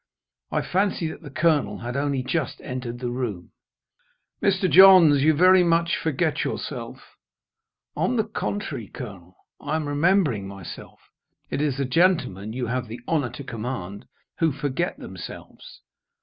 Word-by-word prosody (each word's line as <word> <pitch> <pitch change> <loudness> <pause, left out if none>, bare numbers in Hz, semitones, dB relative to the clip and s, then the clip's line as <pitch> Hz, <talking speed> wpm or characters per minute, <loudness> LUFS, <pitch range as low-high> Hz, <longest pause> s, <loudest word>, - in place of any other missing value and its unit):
I - - -1
fancy 190 -3 0
that - - -9
the 150 - -9
Colonel 155 0 +1
had 120 +1 -6
only 140 -2 -1
just 155 +4 -2
entered 125 -1 -5
the 120 0 -4
room. 115 -8 -4 0.9
"Mr. 190 -1 +2
Johns, 175 -4 +8
you 155 +2 +4
very 185 +3 +6
much 170 0 +2
forget 155 0 -1
yourself." - - -6 0.8
"On 250 - 0
the 220 - +2
contrary, 205 - -4
Colonel, 95 -8 -10 0.2
I 155 - -3
am 155 -2 -2
remembering 145 - +2
myself. 95 -3 -10 0.5
It - - -1
is 145 -3 0
the 140 - 0
gentlemen 130 - +1
you 125 +2 -3
have 125 +1 -2
the 115 +2 -8
honour 145 -6 0
to 140 - -9
command, 110 -4 -6 0.3
who 165 -2 +3
forget 145 +5 -2
themselves. - - -10
145 Hz, 145 wpm, -24 LUFS, 120-170 Hz, 0.9 s, Johns